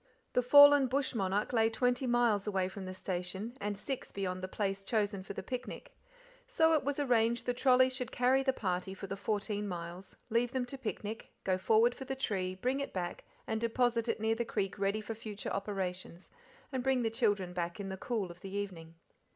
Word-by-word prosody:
The 250 - +4
fallen 285 +1 +8
bush 270 +2 0
monarch 200 +1 0
lay 225 -1 +4
twenty 245 +3 +1
miles 235 -4 +2
away 190 -3 +1
from 190 0 -7
the 185 - -5
station, 190 +5 -4
and 205 0 -2
six 265 +5 -5
beyond 185 -2 -3
the 185 - -3
place 195 0 -2
chosen 205 -2 0
for 190 - -7
the - - -6
picnic; 250 -1 -6 0.5
so 325 -10 +4
it 310 - +3
was 285 +1 -1
arranged 235 -4 +2
the 245 - +1
trolly 255 0 +5
should 255 -2 -4
carry 255 +2 +3
the 265 0 +2
party 190 -5 -2
for 195 - -7
the 195 - -4
fourteen 205 0 -2
miles, 175 +1 -7 0.2
leave 235 +2 +1
them 260 -1 0
to 270 +2 -7
picnic, 220 -2 -5
go 185 - +2
forward 225 +5 +4
for 265 - -8
the 270 - -3
tree, 190 -8 -2
bring 255 +8 -1
it 280 - -4
back, 175 -2 -4 0.2
and 220 0 -2
deposit 235 0 +1
it - - 0
near 220 +1 +2
the 230 +1 -1
creek 195 -4 -2
ready 200 +2 +1
for 225 - -5
future 215 -2 -6
operations, 190 -3 -4 0.4
and 260 -2 -1
bring 260 -1 +2
the 225 - 0
children 205 -6 +1
back 175 +1 -3
in 195 -1 -4
the 190 - -3
cool 210 -5 -2
of 175 +1 -14
the 195 - -7
evening. 185 -5 -5
215 Hz, 210 wpm, -33 LUFS, 195-245 Hz, 0.5 s, fallen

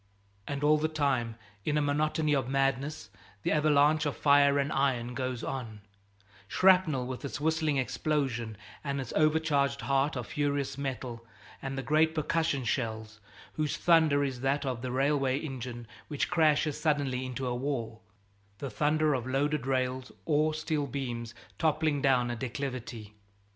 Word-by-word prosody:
'" 100 0 -36
And 140 0 -3
all 150 +1 +5
the 155 - +1
time, 135 -7 0 0.3
in 150 +6 0
a - - +3
monotony 150 +1 +1
of 130 -3 0
madness, 135 -2 -1 0.3
the - - +1
avalanche 150 0 +3
of 145 - -3
fire 140 -1 +5
and 140 +1 0
iron 125 -3 0
goes 130 -1 -3
on; 115 -6 -5 0.7
shrapnel 180 - +4
with 130 +2 -6
its 140 - -4
whistling 155 -1 +1
explosion 130 -4 -1 0.3
and 140 -1 -2
its 130 -4 -5
overcharged 155 -2 +2
heart 135 +2 +1
of 125 -3 -3
furious 145 0 -1
metal 130 -4 -5 0.4
and 135 0 -4
the 135 - -3
great 155 +4 +3
percussion 155 -3 0
shells, 110 -2 -3 0.3
whose 155 -2 -1
thunder 160 -4 +4
is 130 -3 -3
that 135 +2 0
of 125 -3 -2
the 130 -1 -3
railway 135 0 +1
engine 125 -5 -6 0.2
which 145 +2 -2
crashes 155 -3 +2
suddenly 140 -5 +1
into 130 0 -4
a 125 - -1
wall, 120 -4 -3 0.6
the 135 +2 -5
thunder 155 0 +2
of 125 -2 -2
loaded 135 0 0
rails 130 -1 -1
or 155 0 +2
steel 155 -2 -1
beams, 120 -4 -4 0.2
toppling 155 -2 +1
down 125 -3 +3
a - - -2
declivity. 120 -3 -5
140 Hz, 155 wpm, -30 LUFS, 125-150 Hz, 0.7 s, all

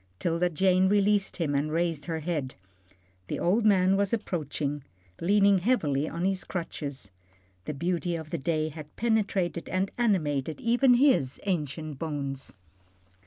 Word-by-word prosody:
'Tilda 170 - 0
Jane 185 +2 +3
released 205 0 +2
him 160 -5 -1
and 145 +2 0
raised 165 -3 -1
her 160 -1 -3
head. 150 -5 -3 0.7
The - - -3
old 215 +6 +2
man 190 -2 +4
was 200 -1 +1
approaching, 150 - -2 0.4
leaning 200 +1 +4
heavily 155 - +1
on 170 +2 -3
his 190 -1 0
crutches. 145 - -5 0.5
The 150 - -4
beauty 175 +3 -1
of 160 -2 -7
the 170 - -2
day 155 +2 0
had 155 -1 -11
penetrated 200 -7 0
and 185 +1 -1
animated 155 - 0
even 245 +2 +4
his 245 - +3
ancient 155 -5 -3
bones. 140 -4 -4
170 Hz, 140 wpm, -28 LUFS, 150-195 Hz, 0.7 s, man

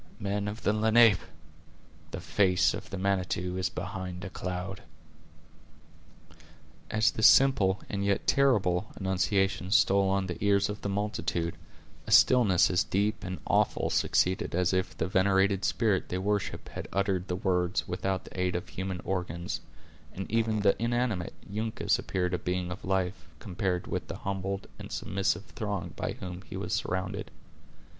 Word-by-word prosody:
Men 100 +1 -2
of 105 +2 -6
the 105 - +2
Lenape! 110 -1 +5 0.9
the 80 - -6
face 90 -1 +2
of - - -7
the 95 - -5
Manitou 90 -1 -1
is 95 0 0
behind 90 -1 -5
a 95 - -7
cloud." 90 +1 -5 2.1
As 110 +2 +3
this 110 - +5
simple 105 -8 +5
and 100 -1 -3
yet 100 -1 0
terrible 105 -8 +2
annunciation 95 0 0
stole 100 -1 +4
on 95 0 +1
the 90 +1 -5
ears 100 0 +3
of 105 0 -5
the 100 - -3
multitude, 100 -4 -2 0.5
a - - -4
stillness 110 -5 +5
as 90 0 +3
deep 105 +2 -1
and 95 0 -5
awful - - +1
succeeded 95 -1 +1
as 90 +1 +2
if 95 0 -1
the - - -1
venerated 95 +1 +2
spirit 105 -6 +1
they 90 - -2
worshiped 100 +2 -2
had - - -6
uttered 95 -2 0
the 90 - -1
words 90 -2 0
without 95 +1 -2
the - - -9
aid 90 -1 0
of 90 - -4
human 95 -1 -4
organs; 90 -2 -3 0.5
and 95 - -4
even 110 -2 +1
the 100 -1 +4
inanimate 115 -6 -1
Uncas 110 +2 -1
appeared 90 -1 -2
a 90 - 0
being 90 0 -2
of 90 - -7
life, 95 -3 -1
compared 90 +1 -2
with - - -4
the - - -6
humbled 95 0 -3
and - - -9
submissive 95 0 -1
throng 100 -4 -4
by - - -3
whom 90 0 -7
he - - -5
was - - -3
surrounded. 95 +2 -2
95 Hz, 155 wpm, -29 LUFS, 90-100 Hz, 2.1 s, Lenape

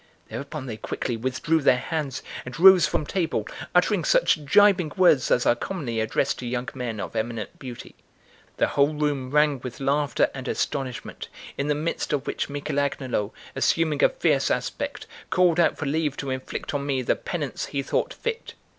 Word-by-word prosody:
Thereupon 140 0 -6
they 115 -4 -5
quickly 120 +2 -3
withdrew 130 +7 0
their 130 -2 +5
hands 140 -1 -3 0.2
and 125 +5 -8
rose 185 -2 +8
from 150 - -1
table, 175 +1 -1 0.3
uttering - - +3
such - - +3
gibing 180 0 +5
words 175 -8 +5
as 120 - +3
are - - +5
commonly 120 -4 -4
addressed 110 0 0
to 125 - -5
young 125 +1 -2
men 120 -4 -4
of - - -6
eminent 110 -2 -3
beauty. 125 -3 -9 0.6
The - - +2
whole 145 +2 +2
room 145 -3 -1
rang 150 -1 +3
with 125 0 -8
laughter 140 -1 +1
and - - -7
astonishment, 130 -3 -3 0.3
in 140 - -2
the 150 - +2
midst 155 +1 -2
of 145 -1 -1
which - - -2
Michel 145 0 -2
Agnolo, 130 -6 -1 0.2
assuming 160 -3 +1
a - - +7
fierce - - +1
aspect, - - -3 0.2
called 175 -2 +3
out 170 - +3
for 155 - -3
leave 150 0 0
to 140 -1 -3
inflict 130 +2 -5
on 145 -1 -1
me 135 -2 -1
the - - +2
penance - - -4
he 140 -1 -2
thought - - -1
fit. 465 -1 -5
140 Hz, 180 wpm, -25 LUFS, 125-155 Hz, 0.6 s, rose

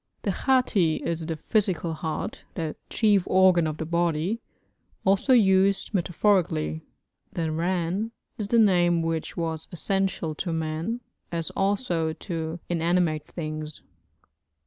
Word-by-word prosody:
The - - +1
hati 230 - +2
is 165 -1 -2
the 165 - -2
physical 185 -1 0
heart, 160 +6 -4
the 160 -4 -3
'chief' 210 -3 +3
organ 185 -3 +5
of 155 0 -3
the 160 - -3
body, 170 +5 0 0.6
also 195 +7 +3
used 195 -4 +4
metaphorically. 175 - +1 0.5
The 165 -2 -1
ran 180 +6 -1 0.2
is 210 - -4
the 235 - +2
name 175 -6 +4
which 165 -1 -3
was 160 -2 -1
essential 190 -2 -1
to 170 +3 -3
man, 160 +8 -2 0.3
as 165 -2 -1
also 195 -5 0
to 165 -1 -4
inanimate 170 -2 +1
things. 155 -2 -6
170 Hz, 125 wpm, -26 LUFS, 160-195 Hz, 0.6 s, organ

